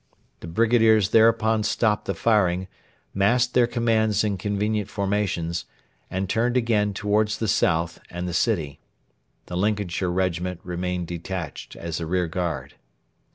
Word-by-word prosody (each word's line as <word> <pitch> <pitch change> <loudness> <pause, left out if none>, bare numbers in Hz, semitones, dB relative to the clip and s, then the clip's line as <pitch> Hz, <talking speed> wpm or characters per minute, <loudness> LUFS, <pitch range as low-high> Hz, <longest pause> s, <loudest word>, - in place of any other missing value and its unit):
The - - -9
brigadiers 110 +1 +3
thereupon 110 0 +4
stopped 105 0 +1
the 100 - -2
firing, 95 -3 +2 0.5
massed 120 +6 +2
their 120 -1 +4
commands 110 -3 +1
in 105 -2 0
convenient 105 +1 -1
formations, 95 -4 -1 0.4
and 95 +1 -2
turned 120 +4 +1
again 105 -4 +1
towards 105 +1 +1
the 110 - -2
south 85 -3 +1
and 90 +1 -5
the 90 - -4
city. 80 -6 0 0.7
The 90 - -6
Lincolnshire 100 -2 0
Regiment 90 -1 -1
remained 90 0 -3
detached 85 -2 -6
as 85 0 -5
a 80 - -4
rearguard. 90 -1 -2
100 Hz, 130 wpm, -24 LUFS, 90-110 Hz, 0.7 s, thereupon